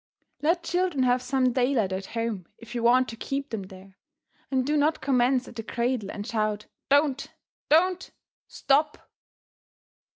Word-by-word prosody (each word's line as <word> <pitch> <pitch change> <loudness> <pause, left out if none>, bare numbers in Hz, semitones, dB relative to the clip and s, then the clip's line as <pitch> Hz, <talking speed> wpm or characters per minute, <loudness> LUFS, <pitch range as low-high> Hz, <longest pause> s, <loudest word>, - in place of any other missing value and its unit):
Let 335 +3 +1
children 350 -5 0
have 250 0 +2
some 255 -1 +1
daylight 245 -6 +1
at 190 +1 -4
home 225 -6 -2
if 230 - -12
you 240 - -2
want 250 +2 +4
to 230 - -7
keep 275 +4 -4
them 220 -3 -3
there, 190 0 -13 0.5
and 260 -2 0
do 300 +2 0
not 300 +2 +2
commence 255 -1 +2
at - - -12
the 225 - -4
cradle 235 -1 -2
and 205 0 -6
shout 215 -2 -1 0.2
"Don't!" 285 -1 +2 0.4
"Don't!" 365 +4 +3 0.4
"Stop!" 295 +2 0
255 Hz, 155 wpm, -26 LUFS, 225-285 Hz, 0.5 s, want